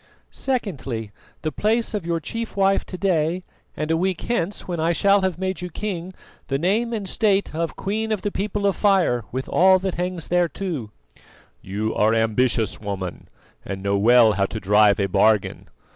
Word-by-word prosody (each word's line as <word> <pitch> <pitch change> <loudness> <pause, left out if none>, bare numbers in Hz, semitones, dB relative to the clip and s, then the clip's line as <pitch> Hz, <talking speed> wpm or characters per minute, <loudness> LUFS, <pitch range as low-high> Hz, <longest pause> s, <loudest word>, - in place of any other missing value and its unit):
"Secondly, 140 - -3 0.3
the 155 - -1
place 225 +6 0
of 200 -5 -3
your 170 -1 0
chief 230 +7 -6
wife 195 0 +3
to 185 - -7
day; 180 -2 0 0.3
and 155 +1 -2
a - - +3
week 185 +1 -1
hence, 205 -5 -2
when 175 -2 -3
I 165 +2 +2
shall 200 +3 +3
have 190 -3 -1
made 190 0 -3
you 180 - -4
king, 185 0 -5 0.3
the 135 - 0
name 210 +9 +1
and 210 -4 -3
state 200 -1 +1
of 165 +1 -2
Queen 220 +3 -2
of 210 -3 -1
the 205 - -1
People 200 +1 -2
of 200 - +2
Fire 185 - +2
with 130 +2 -4
all 190 +1 +5
that 190 0 -3
hangs 180 -3 -3
thereto." 175 - -1 0.7
"You 105 +3 -3
are 110 +2 +3
ambitious, 115 0 +1
woman, 95 -4 -5 0.4
and 95 0 -6
know 100 0 +1
well 115 +2 +6
how 100 -1 +1
to 110 - -5
drive 105 +1 +4
a 100 - +2
bargain. 100 +2 +1
170 Hz, 180 wpm, -23 LUFS, -, 0.7 s, well